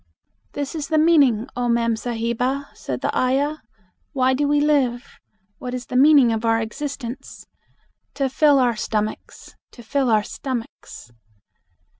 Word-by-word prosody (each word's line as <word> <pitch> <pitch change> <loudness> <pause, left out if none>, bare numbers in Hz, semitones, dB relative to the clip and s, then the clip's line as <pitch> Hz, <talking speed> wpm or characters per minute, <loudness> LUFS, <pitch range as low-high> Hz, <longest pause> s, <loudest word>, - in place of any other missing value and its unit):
"This 285 -1 -4
is 305 -3 -4
the 315 - +1
meaning, 285 -9 +4
Oh 245 0 -1
mem 235 -1 +1
sahiba," 240 +4 -3
said - - -5
the - - -2
ayah: 275 +4 +1 0.6
"Why 260 -2 +2
do 285 +2 0
we 290 0 +2
live? 275 -5 0 0.4
What 250 0 -5
is 250 -1 -6
the - - -7
meaning 270 -3 +6
of 220 0 -3
our 225 0 +2
existence? 250 +2 -6 0.7
To 275 -1 0
fill 285 +2 +3
our 245 -3 +2
stomachs, 215 0 -4 0.2
to 240 - -13
fill 265 +3 0
our 215 -2 +3
stomachs." 235 - -7
255 Hz, 145 wpm, -22 LUFS, 235-285 Hz, 0.7 s, meaning